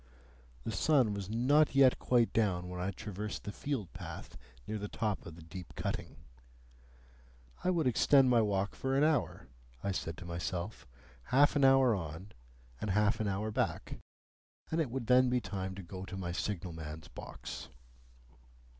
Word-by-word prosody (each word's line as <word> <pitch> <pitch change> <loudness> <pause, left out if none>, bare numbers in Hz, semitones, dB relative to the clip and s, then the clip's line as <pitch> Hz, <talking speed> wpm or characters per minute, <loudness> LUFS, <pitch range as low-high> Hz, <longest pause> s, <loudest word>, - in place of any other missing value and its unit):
The - - -3
sun 130 -9 +3
was 100 -1 -5
not 135 +7 +3
yet 135 -2 +6
quite 120 -2 +3
down 90 -5 +1
when 90 0 -5
I 90 - 0
traversed 105 +1 -5
the 105 - -4
field 130 - -4
path - - -8 0.3
near 110 - -3
the 105 - -4
top 105 -2 -2
of 80 - -9
the 85 - -12
deep 90 +2 -9
cutting. - - -3 1.5
I - - +2
would 170 -4 +2
extend 130 +2 +5
my 120 -2 +5
walk 100 -2 0
for 135 0 -1
an 140 - +4
hour, 150 - +1 0.4
I 100 - 0
said 80 -4 -3
to 90 - -9
myself, 85 +3 -4 0.4
half 145 +3 +4
an 145 - +3
hour 135 -2 +6
on 85 +1 -5 0.5
and 105 - -3
half 105 +4 +2
an 110 - 0
hour 100 +2 -1
back, - - -2 0.7
and 165 +1 +2
it 145 - -1
would 130 0 -3
then 125 +1 +5
be 125 0 +2
time 95 -4 -4
to 95 - -7
go 95 +2 -7
to 95 - -7
my 90 -2 -3
signal 90 -1 -3
man's 80 -1 -7
box. - - -8
105 Hz, 170 wpm, -33 LUFS, 95-130 Hz, 1.5 s, yet